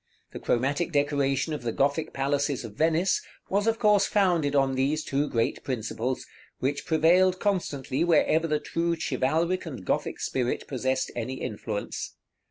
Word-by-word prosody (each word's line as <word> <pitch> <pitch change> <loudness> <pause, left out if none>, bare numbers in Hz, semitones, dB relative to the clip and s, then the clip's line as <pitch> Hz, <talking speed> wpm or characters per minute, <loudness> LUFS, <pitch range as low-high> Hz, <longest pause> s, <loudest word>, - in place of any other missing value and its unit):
The - - -6
chromatic 140 +8 0
decoration 145 0 +1
of 150 - -4
the 120 -1 -2
Gothic 145 +6 0
palaces 140 -1 -1
of 110 - -8
Venice 165 - +2 0.3
was 200 +3 +1
of 225 0 +2
course 210 -2 +4
founded 175 -8 +2
on 135 -1 +3
these 140 +4 0
two 140 +2 -1
great 115 -1 -1
principles, 125 0 -3 0.3
which 140 +2 -2
prevailed 180 +4 +4
constantly 155 -8 -1
wherever 165 -1 +3
the 150 -1 +1
true 170 +2 -1
chivalric 160 +7 0
and 125 - -7
Gothic - - -1
spirit 125 -2 -2
possessed 130 0 -1
any 120 +2 -3
influence. 110 -4 -5
145 Hz, 150 wpm, -27 LUFS, 130-165 Hz, 0.3 s, course